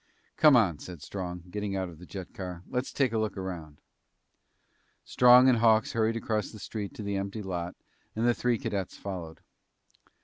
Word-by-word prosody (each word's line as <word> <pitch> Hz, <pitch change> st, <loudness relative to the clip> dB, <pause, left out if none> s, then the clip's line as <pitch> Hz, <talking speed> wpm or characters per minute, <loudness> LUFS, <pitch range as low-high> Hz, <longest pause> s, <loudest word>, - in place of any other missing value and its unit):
"Come 150 Hz, -3 st, +7 dB
on," 95 Hz, -10 st, +3 dB
said 85 Hz, -5 st, -9 dB
Strong, 90 Hz, -2 st, -5 dB
getting 105 Hz, -1 st, -3 dB
out 95 Hz, -1 st, -1 dB
of 85 Hz, -3 st, -12 dB
the 90 Hz, -, -12 dB
jet 95 Hz, -3 st, -8 dB
car. 90 Hz, -2 st, -6 dB
"Let's 125 Hz, +1 st, -2 dB
take 130 Hz, -5 st, +1 dB
a 110 Hz, -, +1 dB
look 110 Hz, -3 st, -2 dB
around." 85 Hz, -6 st, -6 dB, 1.2 s
Strong 125 Hz, +1 st, +7 dB
and 125 Hz, -3 st, +5 dB
Hawks 110 Hz, -1 st, +4 dB
hurried 115 Hz, 0 st, +1 dB
across 110 Hz, -2 st, -1 dB
the 110 Hz, -, -11 dB
street 105 Hz, 0 st, -6 dB
to 105 Hz, -, -6 dB
the 100 Hz, -1 st, -2 dB
empty 100 Hz, +2 st, -4 dB
lot 90 Hz, -2 st, -4 dB, 0.4 s
and 110 Hz, +2 st, 0 dB
the 120 Hz, -, +5 dB
three 120 Hz, 0 st, +1 dB
cadets 95 Hz, -3 st, -3 dB
followed. 90 Hz, -5 st, -7 dB
100 Hz, 180 wpm, -29 LUFS, 90-115 Hz, 1.2 s, Come